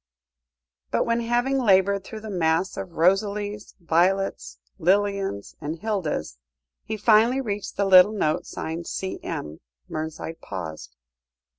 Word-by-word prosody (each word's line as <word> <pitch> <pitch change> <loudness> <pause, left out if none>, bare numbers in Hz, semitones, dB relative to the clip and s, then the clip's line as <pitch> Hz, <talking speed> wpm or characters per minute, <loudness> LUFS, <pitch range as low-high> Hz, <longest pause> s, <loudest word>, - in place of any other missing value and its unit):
But - - +1
when, 230 0 +1
having 240 +3 +1
laboured 200 -3 +3
through 215 +2 -8
the 215 -1 -7
mass 165 0 +1
of 175 - -6
"Rosalies," 205 +4 0
"Violets," 175 - +1 0.2
"Lilians," 195 - 0
and 150 +2 -3
"Hildas," 165 - -3 0.4
he 220 - -4
finally 225 +4 +4
reached 210 -6 -4
the 200 - +2
little 185 +1 +8
note 155 -7 0
signed 165 +1 -5
"C.M.," 80 - -5 0.3
Mernside 160 +1 -5
paused. 80 -9 -7
195 Hz, 120 wpm, -25 LUFS, 160-210 Hz, 0.4 s, little